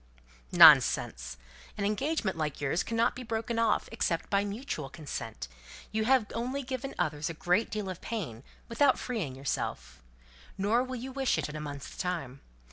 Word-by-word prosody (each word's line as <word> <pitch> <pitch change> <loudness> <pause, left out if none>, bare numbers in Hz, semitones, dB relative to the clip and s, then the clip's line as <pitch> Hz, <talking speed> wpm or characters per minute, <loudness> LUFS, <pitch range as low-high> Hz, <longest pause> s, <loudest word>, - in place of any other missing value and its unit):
"Nonsense. 60 +1 +6 0.4
An 200 - -1
engagement 215 - 0
like 155 -3 -3
yours 145 +4 0
cannot 230 0 +1
be 255 - -6
broken 230 0 -2
off, 230 -2 +2
except 175 -7 -1
by 200 0 +3
mutual 205 - -4
consent. 125 - -6 0.4
You've 220 +3 +3
only 255 +4 -2
given 260 +1 -5
others 150 0 -1
a 165 - -5
great 180 +7 +1
deal 210 -2 -3
of 185 -2 -6
pain 165 - -4 0.3
without 260 +3 +3
freeing 200 - -3
yourself. 70 - -4 0.6
Nor 210 +5 +2
will 255 0 -5
you 255 +2 -6
wish 270 -1 +1
it 150 - -2
in 150 - -7
a 155 - -4
month's 145 -2 -7
time. 165 -8 -3
200 Hz, 160 wpm, -30 LUFS, 150-235 Hz, 0.6 s, Nonsense